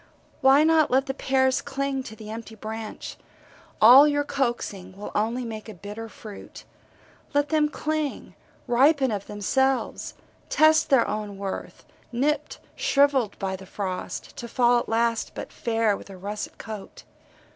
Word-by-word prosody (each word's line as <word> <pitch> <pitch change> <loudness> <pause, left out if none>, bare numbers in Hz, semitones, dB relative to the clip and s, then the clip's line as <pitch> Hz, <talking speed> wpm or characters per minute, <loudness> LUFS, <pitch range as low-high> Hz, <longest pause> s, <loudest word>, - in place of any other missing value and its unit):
Why 270 +2 +6
not 320 -1 +4
let 265 +2 +3
the 270 - -3
pears 265 -1 +1
cling 275 -1 -2
to 220 - -8
the 215 0 -9
empty 225 0 -8
branch? 220 0 -7 0.6
All 255 +7 +9
your 290 -1 +1
coaxing 235 -9 -3
will 205 - -7
only 230 +4 0
make 220 -1 -7
a 215 - -9
bitter 210 +5 -8
fruit 210 -2 -11 0.7
let 290 0 +2
them 305 -1 +2
cling, 305 -1 -3 0.3
ripen 265 +1 +4
of 200 -2 -4
themselves, 265 +6 0 0.3
test 315 0 +4
their 265 -4 +4
own 210 -2 -4
worth, 195 -1 -6 0.3
nipped, 280 +5 -1 0.2
shrivelled 275 -6 +2
by 190 -1 -2
the 190 0 -11
frost, 185 -2 -5
to 235 - -6
fall 240 +1 +3
at - - -6
last 230 0 0
but - - -7
fair 225 -3 +1
with - - -11
a 195 - -10
russet 205 +3 -6
coat. 215 -3 -9
235 Hz, 150 wpm, -25 LUFS, 210-275 Hz, 0.7 s, All